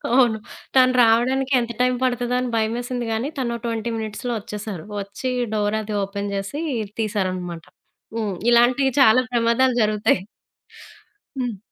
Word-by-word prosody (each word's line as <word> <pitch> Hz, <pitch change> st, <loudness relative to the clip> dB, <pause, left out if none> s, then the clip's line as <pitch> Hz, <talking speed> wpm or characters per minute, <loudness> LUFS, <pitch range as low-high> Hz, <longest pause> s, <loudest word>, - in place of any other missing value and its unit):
అవును. 240 Hz, -4 st, +4 dB, 0.4 s
తను 255 Hz, -1 st, +6 dB
రావడానికి 255 Hz, +4 st, +2 dB
ఎంత 235 Hz, 0 st, -3 dB
టైమ్ 250 Hz, 0 st, +3 dB
పడతదో 245 Hz, -1 st, 0 dB
అని 250 Hz, -1 st, -2 dB
భయమేసింది 240 Hz, +2 st, -1 dB
గానీ, 225 Hz, +5 st, -1 dB
తనో 235 Hz, -2 st, -1 dB
20 230 Hz, 0 st, -2 dB
మినిట్స్‌లో 220 Hz, +3 st, -4 dB
ఒచ్చేశారు. 210 Hz, -5 st, -6 dB, 0.2 s
వచ్చి 200 Hz, +6 st, -4 dB, 0.2 s
డోర్ 210 Hz, 0 st, 0 dB
అది 215 Hz, 0 st, -5 dB
ఓపెన్ 200 Hz, +1 st, -4 dB
జేసి 195 Hz, +11 st, -4 dB, 0.4 s
తీశారనమాట. 185 Hz, -5 st, -2 dB, 0.5 s
హ్మ్. 210 Hz, -4 st, -2 dB, 0.2 s
ఇలాంటియి 250 Hz, +3 st, +4 dB
చాలా 255 Hz, 0 st, +6 dB
ప్రమాదాలు 240 Hz, +2 st, +2 dB
జరుగుతాయి. 210 Hz, -3 st, +2 dB, 1.2 s
హ్మ్. 240 Hz, -5 st, -2 dB
230 Hz, 130 wpm, -22 LUFS, 210-250 Hz, 1.2 s, తను